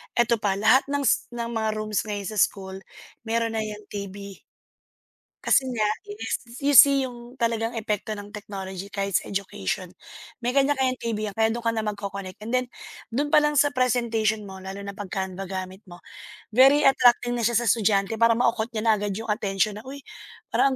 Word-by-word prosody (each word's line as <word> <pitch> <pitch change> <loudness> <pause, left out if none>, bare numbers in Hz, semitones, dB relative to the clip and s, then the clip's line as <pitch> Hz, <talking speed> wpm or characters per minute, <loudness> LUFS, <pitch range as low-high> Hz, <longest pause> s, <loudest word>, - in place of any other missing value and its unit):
eto 235 0 +3
pa, 200 -1 0
lahat 225 +5 +5
ng 285 0 0
s - - +2
ng 235 -1 -4
mga 220 -1 0
rooms 215 -2 -1
ngayon 205 -3 -4
sa 215 -2 -3
school 190 -1 0 0.5
meron 230 0 -1
na 220 - 0
yan 210 -1 -6
TV. 200 -1 -8 1.0
Kasi 265 -1 +3
nga 220 -4 0 0.2
is 415 - -5 0.3
you 290 - +3
see 275 +1 +8
yung 245 0 -10
talagang 230 0 -1
epekto 215 0 -2
ng 205 0 -10
technology 195 -2 -7
kahit 195 -1 -3
sa - - 0
education. 185 - -3 0.5
May 240 - 0
kanya-kanyang 270 -2 +2
TV 230 -2 -3
yan, 195 - -12
kaya 220 0 +3
dun 235 - -4
ka 230 - +1
na 220 -1 -2
magco-connect 200 -2 -5
and 225 +2 -6
then 255 0 +2 0.5
dun 290 +4 0
palang 295 0 +4
sa 290 0 +4
presentation 230 -5 0
mo 190 - -9
lalo 190 +1 -7
na 200 +1 -8
'pag 205 -3 -6
Canva 190 0 -3
gamit 190 +2 -6
mo, 175 -1 -13 0.5
very 270 +5 +6
attracting 245 -2 +4
na 240 - -2
siya 235 +1 +2
sa 240 - +2
estudyante 210 -2 +2
para 230 0 +5
mako-caught 235 -1 +1
niya 215 - -2
na 225 - +5
agad 205 -1 -2
yung 225 -1 -5
atensyon 210 0 -1
na, - - -13
"Uy, 280 0 -9 0.5
parang 275 - +3
220 Hz, 190 wpm, -25 LUFS, 200-240 Hz, 1.0 s, see